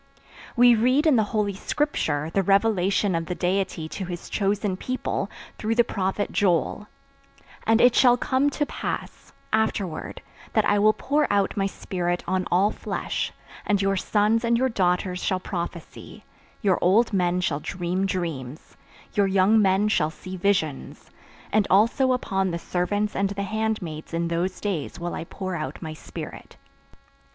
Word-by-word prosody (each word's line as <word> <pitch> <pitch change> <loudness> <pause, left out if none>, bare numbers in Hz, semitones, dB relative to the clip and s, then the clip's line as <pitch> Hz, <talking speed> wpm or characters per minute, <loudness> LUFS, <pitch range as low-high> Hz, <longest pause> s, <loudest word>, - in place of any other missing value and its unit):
We 245 0 +7
read 255 +7 +3
in 305 -4 +5
the 220 -3 +3
Holy 210 -2 0
Scripture 165 - -1
the 195 - +3
revelation 195 0 +2
of 165 -1 -2
the 180 - -3
Deity 180 -3 -1
to 190 - -5
His 175 -1 -7
chosen 200 -1 0
people, 255 +7 -3 0.3
through 220 +1 0
the 240 - +5
prophet 195 -1 -2
Joel: 195 +2 +1 0.8
"And 225 +1 +4
it 245 0 +6
shall 245 -1 +5
come 265 +3 +1
to 295 +1 -1
pass, - - -5 0.2
afterward, 205 -6 -1 0.3
that 215 - +3
I 205 0 +3
will 215 +1 +5
pour 290 +6 0
out 200 0 +1
My 195 -2 +1
Spirit 175 -2 -3
on 185 +1 0
all 190 +4 +3
flesh, - - -3 0.3
and 205 -1 +1
your 195 0 +1
sons 210 +4 +1
and 235 0 +2
your 260 +2 +2
daughters 180 -3 0
shall 185 - 0
prophesy, 175 -2 -7 0.4
your 190 -3 +3
old 210 +6 +3
men 180 -2 +1
shall 155 -5 0
dream 180 +4 -2
dreams, 155 -7 -5 0.4
your 200 -1 +3
young 195 +3 +4
men 195 +1 +3
shall 155 -7 +2
see 185 +4 -9
visions, 180 -7 -1 0.4
and 210 -2 +3
also 230 +7 +4
upon 195 -6 0
the 170 - -2
servants 195 +5 -1
and 195 0 +1
the 200 0 -3
handmaids 200 -7 -3
in 170 0 -1
those 175 +3 -1
days 185 -8 -3
will 175 0 -4
I - - -5
pour 185 +1 -5
out 155 -2 -5
My 160 -2 -6
Spirit." 155 - -9
195 Hz, 160 wpm, -25 LUFS, 180-215 Hz, 0.8 s, We